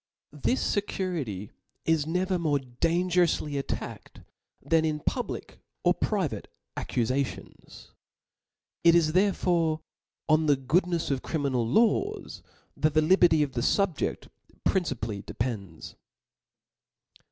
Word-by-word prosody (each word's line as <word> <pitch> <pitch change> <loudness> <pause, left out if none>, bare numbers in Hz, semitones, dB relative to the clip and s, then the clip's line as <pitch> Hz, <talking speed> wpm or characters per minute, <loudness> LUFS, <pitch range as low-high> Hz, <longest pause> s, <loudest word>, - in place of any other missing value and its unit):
This 150 - 0
fecurity 165 - -3 0.3
is 160 -2 +2
never 180 +2 0
more 155 -4 +2
dangeroufty 165 +3 +1
attacked 135 - -6 0.4
than 165 -1 +2
in 155 -1 0
public - - -4 0.2
or - - +5
private - - -2 0.3
accufations. 130 +3 -3 0.9
It 170 0 +7
is 160 -2 +4
there 195 +3 +4
fore 165 -4 +1 0.5
on 155 0 +3
the 145 -2 +4
goodnefs 170 +5 +1
of 135 -2 0
criminal 135 -7 -1
laws 235 - +1 0.3
that 155 0 +1
the 155 - +6
li 180 +5 +6
berty 160 -5 +5
of 140 - -3
the 120 - -2
fubjeft 190 +5 0 0.4
principally 125 - -1
depends. 105 -8 -5
155 Hz, 110 wpm, -28 LUFS, 135-180 Hz, 0.9 s, It